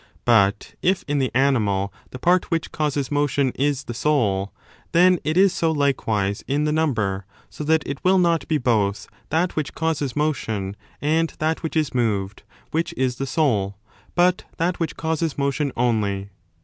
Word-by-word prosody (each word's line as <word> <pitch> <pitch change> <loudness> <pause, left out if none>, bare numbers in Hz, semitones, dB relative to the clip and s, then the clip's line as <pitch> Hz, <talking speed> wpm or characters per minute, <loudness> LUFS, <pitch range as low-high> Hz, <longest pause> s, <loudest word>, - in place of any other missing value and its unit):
But 110 -3 +3
if 185 +1 +1
in 145 0 0
the 130 -2 +1
animal 105 -8 +2 0.2
the - - -8
part 175 +7 +2
which 165 -2 -1
causes 145 -3 -1
motion 145 -2 +1
is 140 0 0
the 120 - -6
soul, 110 -8 +1 0.4
then 180 +1 +5
it 155 +3 0
is 195 0 +5
so 165 -3 +1
likewise 110 -9 0
in 145 +2 +1
the 150 - +1
number: 105 - 0 0.2
so - - -6
that 160 0 +2
it 140 -1 -5
will 190 +1 +4
not 170 -3 +2
be 155 - +2
both 105 -6 0 0.2
that 170 +3 0
which 155 -3 -3
causes 155 -5 -1
motion 110 -10 -1 0.3
and 160 +2 +2
that 160 +1 -1
which 160 -1 -4
is 155 -3 0
moved 105 -5 -1 0.3
which 165 +1 -1
is 130 -1 0
the 135 - -3
soul, 105 -10 +1 0.4
but 180 +1 +3
that 175 +2 0
which 165 - -2
causes 160 -1 -1
10 140 - -2
motion 140 0 0
only. 100 -5 0
140 Hz, 175 wpm, -23 LUFS, 110-160 Hz, 0.4 s, then